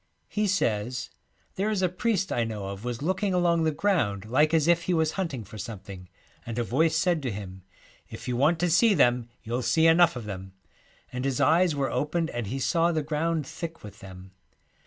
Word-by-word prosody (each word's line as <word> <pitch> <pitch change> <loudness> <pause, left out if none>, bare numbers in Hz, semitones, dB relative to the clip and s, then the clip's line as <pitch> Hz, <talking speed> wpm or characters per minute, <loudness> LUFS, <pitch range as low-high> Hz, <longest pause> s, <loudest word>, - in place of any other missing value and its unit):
He 210 0 0
says, 125 - -1 0.2
' - - -40
There 200 +3 0
is 205 -3 0
a - - +4
priest 190 +1 -1
I 120 - +1
know 105 -4 -4
of 100 +2 -7
was 120 +1 -4
looking 190 +3 0
along 170 -2 +2
the 160 - +2
ground 145 - 0
like 145 +7 +3
as 160 -2 +2
if 170 0 +3
he 180 - +1
was 160 -1 +2
hunting 160 - -3
for 110 +2 -11
something, 95 -3 -8 0.3
and 115 0 -6
a 120 - +1
voice 155 +8 +1
said 170 0 +1
to 130 -4 -2
him, 95 -2 -8 0.5
"If - - -9
you 125 - -1
want 150 +7 +3
to 175 -1 +2
see 210 +5 +5
them 120 -5 +2
you'll 120 +2 -2
see 125 +7 +2
enough 165 -2 +5
of 120 -3 -6
them," 95 -2 -7 0.6
and 125 0 -3
his 135 -2 -1
eyes 165 +1 +4
were 135 -3 -1
opened 160 +2 -1
and 120 -3 -4
he 130 - -3
saw 165 +5 +2
the 155 -2 -1
ground 155 +1 -1
thick 165 +3 -7
with 105 0 -11
them. 95 0 -12
145 Hz, 215 wpm, -27 LUFS, 115-170 Hz, 0.6 s, see